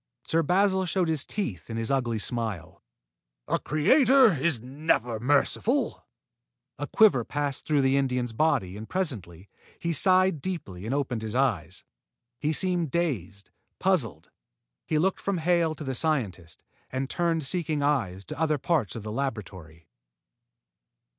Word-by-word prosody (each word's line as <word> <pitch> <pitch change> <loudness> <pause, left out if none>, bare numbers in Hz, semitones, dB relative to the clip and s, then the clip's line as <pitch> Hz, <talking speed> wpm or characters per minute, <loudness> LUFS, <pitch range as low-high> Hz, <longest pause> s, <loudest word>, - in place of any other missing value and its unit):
Sir 165 - +1
Basil 190 +3 +2
showed 180 -1 0
his 155 -4 0
teeth 110 - -4
in 115 - -4
his 115 +2 -2
ugly 120 -4 0
smile. 100 -6 -4 0.7
"A - - +1
creator 255 - +5
is 145 -2 +1
never 125 -3 -1
merciful." 145 - +1 0.7
A - - -3
quiver 205 - +4
passed 145 +1 -3
through 145 -3 +2
the 135 +1 +3
Indian's 125 -3 0
body 115 - +1
and 110 +2 -8
presently, 105 - -4 0.3
he 170 0 -2
sighed 185 -2 +3
deeply 110 - -5
and 130 - -1
opened 130 -5 -2
his 110 +1 -4
eyes. 95 - 0 0.6
He 150 - 0
seemed 175 -1 +1
dazed, 110 - -3 0.3
puzzled. 115 - -1 0.6
He 155 - +1
looked 185 +5 +1
from 200 -2 -1
Hale 165 -1 +1
to 155 - -8
the 135 -2 -3
scientist, 115 - -2 0.3
and 130 +1 -2
turned 165 +1 0
seeking 155 0 -1
eyes 110 -10 0
to 155 -1 -7
other 155 -2 +2
parts 140 - 0
of 115 - -6
the 105 - -5
laboratory. 95 - -5
140 Hz, 145 wpm, -27 LUFS, 110-170 Hz, 0.7 s, creator